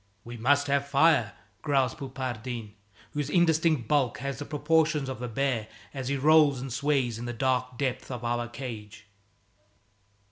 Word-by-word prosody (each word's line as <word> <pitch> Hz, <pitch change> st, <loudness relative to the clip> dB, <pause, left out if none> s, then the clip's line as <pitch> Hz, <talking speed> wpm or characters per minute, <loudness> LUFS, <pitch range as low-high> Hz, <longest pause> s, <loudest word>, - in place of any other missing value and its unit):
"We 120 Hz, +1 st, -8 dB
must 140 Hz, +5 st, +2 dB
have 140 Hz, 0 st, 0 dB
fire," 140 Hz, -6 st, +3 dB, 0.3 s
growls 135 Hz, -4 st, +1 dB
Poupardin, 125 Hz, -5 st, -5 dB, 0.4 s
whose 145 Hz, -1 st, -3 dB
indistinct 160 Hz, -6 st, +2 dB
bulk 135 Hz, -6 st, +1 dB
has 140 Hz, +3 st, -4 dB
the 145 Hz, -, -5 dB
proportions 155 Hz, 0 st, +1 dB
of 130 Hz, -2 st, -5 dB
a 125 Hz, -, -3 dB
bear 120 Hz, -2 st, -1 dB, 0.3 s
as 135 Hz, -3 st, -5 dB
he 140 Hz, +1 st, 0 dB
rolls 150 Hz, -1 st, +5 dB
and 130 Hz, -1 st, -5 dB
sways 130 Hz, -4 st, 0 dB
in 120 Hz, -, -5 dB
the 120 Hz, -, -4 dB
dark 125 Hz, 0 st, -1 dB
depths 130 Hz, -1 st, -2 dB
of 125 Hz, -3 st, -6 dB
our 120 Hz, 0 st, -1 dB
cage. 110 Hz, -4 st, -8 dB
130 Hz, 155 wpm, -28 LUFS, 120-145 Hz, 0.4 s, rolls